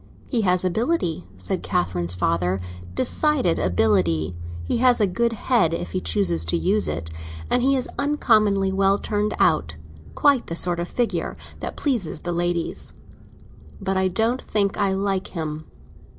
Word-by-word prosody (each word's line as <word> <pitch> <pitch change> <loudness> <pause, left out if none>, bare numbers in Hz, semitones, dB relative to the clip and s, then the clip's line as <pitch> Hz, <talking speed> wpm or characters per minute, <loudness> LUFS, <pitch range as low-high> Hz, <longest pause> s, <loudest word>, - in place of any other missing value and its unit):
"He 240 -4 0
has 185 -2 +2
ability," 185 - -1
said 90 -1 -3
Catherine's 90 0 -1
father, 90 +1 0 0.4
"decided 285 - +2
ability; 90 -3 +1 0.3
he 85 - -1
has 250 0 +4
a - - +3
very 190 -3 0
good 235 +1 +1
head 200 -7 +2
if 85 - -5
he - - -2
chooses 85 0 +1
to 85 - +1
use 90 +3 +1
it. 80 +1 -3 0.4
And 245 - +3
he 270 +2 +3
is 255 - -1
uncommonly 215 -9 +2
well 195 +1 +3
turned 210 0 -1
out; 75 +1 +2 0.4
quite 280 -4 +3
the 165 - -4
sort 175 0 +1
of 170 - -2
figure 240 +3 -2 0.2
that - - -6
pleases 235 - -1
the 175 - -3
ladies. 175 0 -2 0.9
But 195 0 -2
I 190 0 +2
don't 225 +7 +1
think 200 -2 0
I 200 -2 +1
like 195 0 -1
him." 155 -1 -4
180 Hz, 160 wpm, -23 LUFS, -, 0.9 s, has